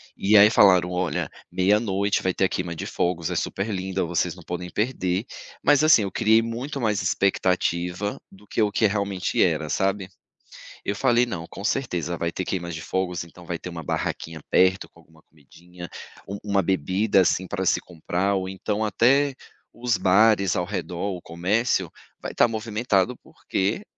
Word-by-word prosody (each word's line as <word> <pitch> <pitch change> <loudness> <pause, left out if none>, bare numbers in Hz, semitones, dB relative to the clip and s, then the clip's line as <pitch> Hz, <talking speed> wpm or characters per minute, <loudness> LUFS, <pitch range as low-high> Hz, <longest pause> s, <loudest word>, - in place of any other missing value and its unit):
E 105 +2 +4
aí, 105 +1 +8
falaram: 90 -5 +5
"Olha, 90 -4 -1 0.2
00:00 100 +1 +1
vai 95 - 0
ter 95 - +1
a - - 0
queima 90 -2 -3
de - - -5
fogos, 85 -2 -1
é - - -2
super 100 +3 -2
linda, 95 -1 -2
vocês 85 -1 -1
não - - -13
podem 90 0 -5
perder.", 100 -2 -1 0.4
mas, 145 +1 +4
assim, 155 -8 +6
eu 100 - -3
criei 110 +1 +4
muito 125 +5 -4
mais 105 -4 +1
expectativa 90 0 0
do 100 +2 -17
que, - - -4
eh, - - +5
o 105 - +1
que 110 - +2
realmente 100 -2 -1
era, 80 -3 0
sabe? 95 +4 0 0.8
Eu 100 - -2
falei: 120 +4 +3
"Não, 95 -9 -5
com 100 - -9
certeza 90 - -1
vai 85 0 -2
ter 95 - -4
queimas 85 -2 -3
de 80 - -6
fogos, 90 +2 -2
então 85 +1 -14
vai 85 0 -3
ter - - -7
uma 85 -2 -7
barraquinha 80 +1 -3
perto 95 +1 +3
com 85 - -22
alguma 80 -1 -22
comidinha, 85 +4 -13 0.4
um 100 +1 -5
uma 100 -2 +1
bebida, 95 +3 +2
assim, 95 0 +1
pra 95 -2 -3
se - - +3
comprar, 90 +3 -2
ou 95 -1 -2
então, 105 +3 -2
até 135 +6 +3 0.4
os 120 -1 0
bares 100 0 +4
ao 90 - 0
redor, 90 0 -5
ou 90 - -4
o - - -13
comércio 95 +10 0 0.3
vai - - -5
estar - - +4
movimentado 110 0 0
porque 100 - -3
95 Hz, 185 wpm, -24 LUFS, 90-105 Hz, 0.8 s, aí